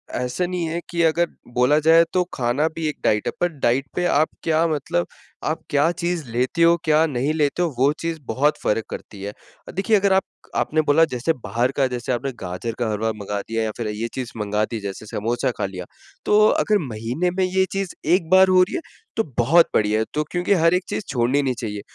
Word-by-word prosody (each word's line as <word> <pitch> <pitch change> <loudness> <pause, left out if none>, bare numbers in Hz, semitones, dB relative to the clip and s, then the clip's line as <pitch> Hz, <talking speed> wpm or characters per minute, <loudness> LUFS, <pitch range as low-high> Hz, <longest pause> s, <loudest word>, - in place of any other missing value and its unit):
ऐसा 125 +8 -1
नहीं 175 -1 -2
है 165 +2 -2
कि 170 -1 -1
अगर 165 +1 +3 0.3
बोला 125 +5 +3
जाए, 165 +2 +6
तो 185 - +3
खाना 130 +4 +1
भी 160 -1 -2
एक 150 - -3
डाइट 105 -1 +1
है, - - +1
पर 175 - +3
डाइट 130 +2 +2
पे 180 - 0
आप 155 -2 +3
क्या 160 0 +2
मतलब 140 - -1 0.4
आप - - -2
क्या 145 +3 +3
चीज़ 175 -1 -2
लेते 125 +8 -1
हो, 170 0 +6
क्या 155 +1 +4
नहीं 140 0 -1
लेते 150 +2 0
हो, 175 - +2
वो 135 +3 +4
चीज़ 165 -1 -3
बहुत 140 +7 +1
फ़र्क 110 +1 0
करती 100 - -8
है। 100 - -4 0.4
देखिए, 200 +4 +2
अगर 200 -1 +2
आप 190 - +3 0.3
आपने 155 +1 +1
बोला, 150 +2 +4
जैसे 130 +2 -1
बाहर 120 +3 0
का 135 - +3
जैसे 125 0 -4
आपने 125 +3 -2
गाजर 95 +6 -4
का 120 -2 0
हलवा 110 +1 -1
मँगा 105 -1 -4
दिया 115 0 -1
या 110 - -1
फिर 115 -2 -3
ये 105 +2 -3
चीज़ 125 -2 -5
मँगा 105 0 0
दी, 115 +1 -5
जैसे 100 +1 -6
समोसा 115 +4 -1
खा 100 - -1
लिया, 90 -2 -6 0.4
तो 210 - +4
अगर 215 -1 +2
महीने 120 +11 -2
में 190 - +2
ये 190 +1 +2
चीज़ 195 -2 -3 0.2
एक 170 -4 -2
बार 190 +1 +7
हो 185 0 +6
रही 180 - -4
है, 360 - -2 0.3
तो 225 - +1
बहुत 160 +9 +5
बढ़िया 105 0 +2
है, 110 - 0
तो 150 - 0
क्योंकि 175 +2 +1
हर 165 -2 +3
एक 180 0 +1
चीज़ - - -3
छोड़नी 125 +3 +1
नहीं 135 -2 0
चाहिए। 105 -3 -4
145 Hz, 225 wpm, -22 LUFS, 115-170 Hz, 0.4 s, बार